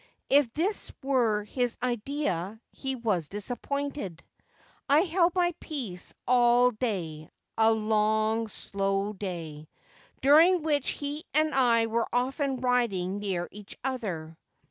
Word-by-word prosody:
If 275 -4 +5
this 380 +7 0
were 240 -6 +2
his 245 +3 -1
idea 230 - -2
he 265 -1 -4
was 210 - -1
disappointed. 245 - -4 0.7
I 290 +3 +6
held 345 0 +2
my 350 -1 +2
peace 230 - -5
all 245 0 +5
day 180 -10 -3
— - - -55
a 225 0 +6
long, 220 +1 +1
slow 195 0 -2
day 165 -6 -6 0.3
— - - -29
during 320 +5 +6
which 290 -3 +1
he 290 +2 -4
and 310 0 +3
I 240 -4 +4
were 230 +1 0
often 265 +1 -1
riding 205 -7 +1
near 185 -4 -2
each 210 0 -11
other. 185 -12 -4
235 Hz, 125 wpm, -28 LUFS, 200-275 Hz, 0.7 s, I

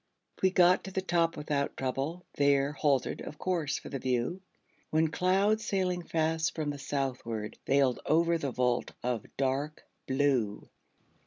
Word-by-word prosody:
We 190 - +5
got 180 -1 +4
to 190 - -6
the 190 0 -2
top 170 -2 +1
without 145 -1 -2
trouble; 135 +7 -2
There 140 0 +3
halted, 140 -3 0
of 150 - -8
course, 170 -6 -1
for - - -9
the 135 - -4
view; 125 +9 -1 0.5
When 155 0 +2
clouds, 195 +6 +2
sailing 185 -4 0
fast 160 -1 0
from 155 -2 -1
the 145 - -7
southward, 125 -6 -3
Veiled 135 -2 +3
over 170 +1 +3
the 140 - -2
vault 125 0 0
of 120 -3 -2
dark 140 +3 -1 0.2
blue. 130 -6 +1
145 Hz, 150 wpm, -30 LUFS, 135-170 Hz, 0.5 s, We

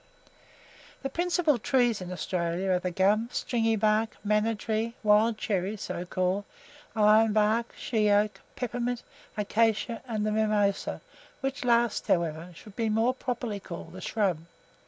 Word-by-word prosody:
The 270 - -3
principal 340 -4 +1
trees 245 -4 +2
in 180 0 -6
Australia 180 +1 -1
are 180 - +3
the 180 - -2
gum, 205 +6 +2
stringy 225 -2 0
bark, 215 +1 +1
manna 210 +2 +2
tree, 220 +2 -2
wild 215 +1 +4
cherry 200 0 -1
(so 180 -2 -5
called), 185 +2 0 0.5
iron 215 0 +5
bark, 220 +2 +2
shea 215 -3 +1
oak, 205 +1 +2 0.2
peppermint, 245 0 -2 0.3
acacia, 225 +2 +1
and 215 -3 -1
the 215 - 0
mimosa, 210 -2 +1 0.4
which 270 0 -3
last, 235 -2 +2
however, 165 0 0
should 205 +3 -13
more 225 +4 +2
properly 245 -4 -3
be 195 - -13
called 170 +1 -8
a 185 - -8
shrub. 195 -7 0
215 Hz, 140 wpm, -28 LUFS, 200-230 Hz, 0.5 s, iron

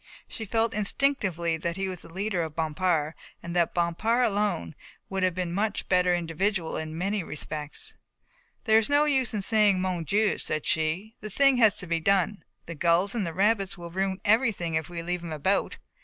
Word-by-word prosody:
She 220 - -6
felt 225 +2 +1
instinctively 200 - 0
that 170 +2 -3
he 195 0 -1
was 185 -2 -6
the - - -13
leader 190 0 -1
of 160 -2 -5
Bompard 160 -1 0 0.3
and 170 +1 -6
that 170 -2 +1
Bompard 215 +8 +1
alone 205 - -1 0.4
would 190 0 -1
have 185 -2 +1
been 180 -1 -2
a - - -4
much 210 +2 -1
better 180 -1 +3
individual, 175 +2 -1
in 160 0 -5
many 195 +2 -1
respects. 150 -1 -5 0.7
"There 220 -2 +5
is 220 - -1
no 290 +1 +4
use 260 -6 +1
in 205 - -1
saying 210 -3 +3
'Mon 185 -2 -1
Dieu,'" 210 +5 +1
said 155 -1 -1
she, 165 +8 0
"the 215 - -6
thing 275 +4 +4
has 220 -4 +5
to 180 - -1
be 170 -1 0
done. 195 +3 +1 0.2
The 170 - -6
gulls 170 +5 +2
and 215 -7 -1
the 165 - -4
rabbits 195 -1 +1
will 170 -1 -8
ruin 190 +1 -1
everything 210 -6 +2
if 160 +1 -1
we 170 -1 -5
leave 175 +1 -2
things 165 -2 -5
about. 190 +7 0
185 Hz, 200 wpm, -27 LUFS, 170-210 Hz, 0.7 s, There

